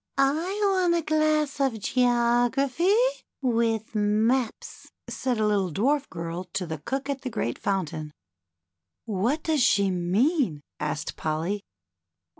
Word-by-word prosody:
want 360 +6 +2
a 335 - 0
glass 310 -2 +1
of 265 -5 +1
Geography, 245 - +2 0.5
with 230 -3 0
Maps," 220 +3 0 0.2
said 255 -3 -2
a 215 - +2
little 200 -4 +1
dwarf 270 - +1
girl 170 +1 -5
to 185 - -1
the 160 -2 -5
cook 270 - -3
at 275 -2 -3
the 255 - -4
great 205 - -3
foun 195 -3 0
tain. 155 0 -7 0.9
What 230 +8 0
does 315 -4 +1
she 200 -5 +3
mean? 185 - +1
" - - -62
asked 150 +1 -3
Polly. 160 +6 -2
235 Hz, 130 wpm, -26 LUFS, 195-280 Hz, 0.9 s, she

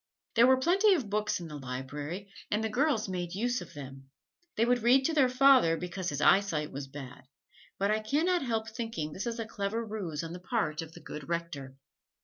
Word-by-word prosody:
There 235 +1 +6
was 260 0 +4
plenty 390 +5 +5
of 240 - -3
books 210 -1 0
in 170 - -7
the 150 -2 -7
library, 145 +8 -5 0.2
and 210 +1 0
the 220 - 0
girls 250 -1 +1
made 180 -1 -4
use 245 +4 0
of - - -11
them. 135 -1 -9 0.5
They 225 - +3
would 245 0 +2
read 255 +4 +5
to 325 - +1
their 275 -5 +4
father 255 -10 +5
"because 180 +2 -4
his 145 0 -3
eyesight 165 -5 +3
was 140 0 -6
bad," 135 -2 -10 0.5
but 200 +1 +1
I 215 - +2
can 280 +10 0
not 360 -1 +2
help 225 -4 -1
thinking 225 -9 -4
this 195 - -4
a 230 -1 -3
clever 215 +2 -3
ruse 185 -8 -4
on 165 0 -6
the 180 - -7
part 180 -6 -1
of 165 0 -9
the 170 - -12
good 150 0 -8
Rector. 165 -6 -4
200 Hz, 210 wpm, -30 LUFS, 155-235 Hz, 0.5 s, There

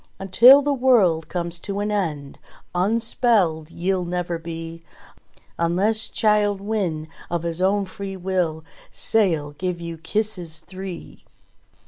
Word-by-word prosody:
Until 240 +9 +7
the 290 0 +1
world 220 - +3
comes 170 -1 -4
to 200 +2 -4
an 205 +1 -1
end 155 -9 -3 0.3
Unspelled 195 -4 +1
ye'll 180 +2 -1
never 175 -1 -3
be, 165 0 -7 0.8
Unless 195 +7 +2
Childe 210 -2 +2
Wynde 195 -7 -2 0.2
of 170 -1 -2
his 170 +1 -3
own 195 +1 +2
free 195 0 -7
will 175 -4 -1 0.3
Sail 165 -10 0
give 175 +3 -4
you 170 -1 -7
kisses 180 -3 -3
three 185 -1 -9
185 Hz, 120 wpm, -22 LUFS, 165-205 Hz, 0.8 s, Until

